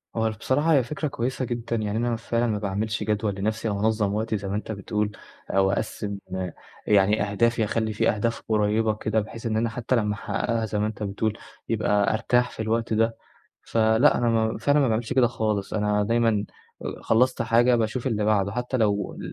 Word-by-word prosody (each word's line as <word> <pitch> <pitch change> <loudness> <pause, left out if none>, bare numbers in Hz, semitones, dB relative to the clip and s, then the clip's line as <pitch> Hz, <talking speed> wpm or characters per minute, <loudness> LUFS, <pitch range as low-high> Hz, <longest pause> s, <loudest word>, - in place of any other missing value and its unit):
هو 110 -1 +1
بصراحة 130 +9 +1
هي 135 -4 +4
فكرة 150 +5 -3
كويسة 130 -2 -2
جدًا، 120 -1 -3
يعني 105 -1 -1
أنا 120 0 0
فعلًا 115 +1 -1
ما 110 -2 0
باعملش 105 +2 -2
جدول 105 -1 -1
لنفسي 110 +3 -2
أو 100 -1 -2
أنظَّم 105 -1 +1
وقتي 110 0 -1
زي 100 - -6
ما 100 - -2
أنت 105 +1 -4
بتقول 105 +1 -2 0.4
أو 95 0 +3
أقسِّم 100 0 -3 0.7
يعني 105 +1 +4
أهدافي، 115 +3 +1
أخلي 110 +1 -1
في 105 - +2
أهداف 115 +2 -1
قريّبة 110 +1 +2
كده 110 +1 0
بحيث 110 +2 -7
إن 110 -1 0
أنا 115 +1 +1
حتى 120 +2 -1
لمّا 105 -3 +1
أحققها 115 +2 -2
زي 105 -1 -2
ما 105 - +1
أنت 110 0 -5
بتقول، 105 +2 -2 0.3
يبقى 105 -2 +2
أرتاح 125 +3 +2
في - - -6
الوقت 115 +1 -1
ده، 115 +1 +1 0.5
فلأ 110 +5 +3
أنا 120 - +1
ما 110 -1 +1
فعلًا 145 +1 +3
ما 135 - +3
باعملش 115 +1 -1
كده 130 -2 +4
خالص، 110 -5 -2
أنا 105 -1 +1
دايمًا 115 -1 +2 0.4
آآ، - - -6
خلّصت 125 +2 +2
حاجة 120 +2 +4
باشوف 115 +2 -1
اللي 105 -4 0
بعدُه 100 -2 +2
حتى 125 +3 -2
لو 105 -4 0
110 Hz, 195 wpm, -25 LUFS, 105-115 Hz, 0.7 s, هي